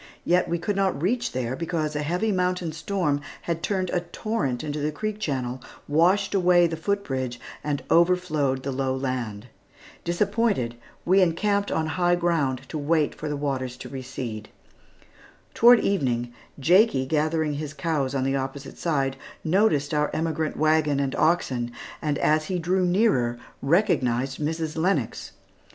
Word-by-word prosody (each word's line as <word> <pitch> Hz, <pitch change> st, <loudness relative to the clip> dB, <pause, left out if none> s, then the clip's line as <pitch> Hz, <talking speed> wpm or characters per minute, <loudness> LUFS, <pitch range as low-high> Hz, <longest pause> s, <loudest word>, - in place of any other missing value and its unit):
Yet 180 Hz, 0 st, +2 dB
we 170 Hz, -, +1 dB
could 205 Hz, +4 st, -2 dB
not 195 Hz, -6 st, +1 dB
reach 235 Hz, -, 0 dB
there, 130 Hz, 0 st, -2 dB
because 160 Hz, -1 st, -2 dB
a 150 Hz, -, 0 dB
heavy 180 Hz, +8 st, 0 dB
mountain 180 Hz, -3 st, 0 dB
storm 165 Hz, -3 st, -1 dB, 0.2 s
had 165 Hz, -1 st, -2 dB
turned 185 Hz, -2 st, -1 dB
a 180 Hz, -, +1 dB
torrent 170 Hz, -, -3 dB
into 150 Hz, 0 st, -3 dB
the 150 Hz, +1 st, -1 dB
creek 215 Hz, +7 st, -4 dB
channel, 130 Hz, -, -2 dB, 0.3 s
washed 180 Hz, +7 st, +3 dB
away 180 Hz, -2 st, +5 dB
the 165 Hz, -1 st, -1 dB
foot 200 Hz, +5 st, -1 dB
bridge, 130 Hz, -6 st, -3 dB, 0.2 s
and 145 Hz, -1 st, -2 dB
overflowed 165 Hz, -6 st, +2 dB
the 140 Hz, -, -2 dB
low 130 Hz, 0 st, -1 dB
land. 125 Hz, -5 st, -3 dB, 0.6 s
Disappointed, 200 Hz, -, 0 dB, 0.3 s
we 190 Hz, +3 st, +5 dB
encamped 200 Hz, +4 st, +1 dB
on 160 Hz, -, 0 dB
high 175 Hz, +2 st, +2 dB
ground 145 Hz, -7 st, 0 dB
to 155 Hz, -, -4 dB
wait 150 Hz, +1 st, +1 dB
for 155 Hz, -, -5 dB
the 145 Hz, -, -2 dB
waters 130 Hz, -3 st, -2 dB
to -, -, -9 dB
recede. 125 Hz, -5 st, -6 dB, 1.0 s
Toward 240 Hz, 0 st, +7 dB
evening, 120 Hz, -10 st, 0 dB, 0.3 s
Jakie 175 Hz, -, +4 dB
gathering 155 Hz, +1 st, 0 dB
his 145 Hz, 0 st, -4 dB
cows 145 Hz, -5 st, -1 dB
on 130 Hz, -, +1 dB
the 135 Hz, +1 st, 0 dB
opposite 135 Hz, +1 st, -5 dB
side, 135 Hz, -5 st, 0 dB, 0.3 s
noticed 160 Hz, -5 st, +2 dB
our 150 Hz, 0 st, +2 dB
emigrant 160 Hz, -1 st, -1 dB
wagon, 155 Hz, -2 st, +2 dB
and 135 Hz, -1 st, -1 dB
oxen, 130 Hz, -8 st, +1 dB, 0.3 s
and 150 Hz, -2 st, 0 dB
as 155 Hz, 0 st, +2 dB
he 185 Hz, +3 st, -2 dB
drew 180 Hz, +2 st, +1 dB
nearer 175 Hz, -, +2 dB, 0.2 s
recognized 135 Hz, -, +1 dB
Mrs. 160 Hz, +1 st, -2 dB
Lennox. 160 Hz, -, -1 dB
155 Hz, 155 wpm, -25 LUFS, 135-180 Hz, 1.0 s, Toward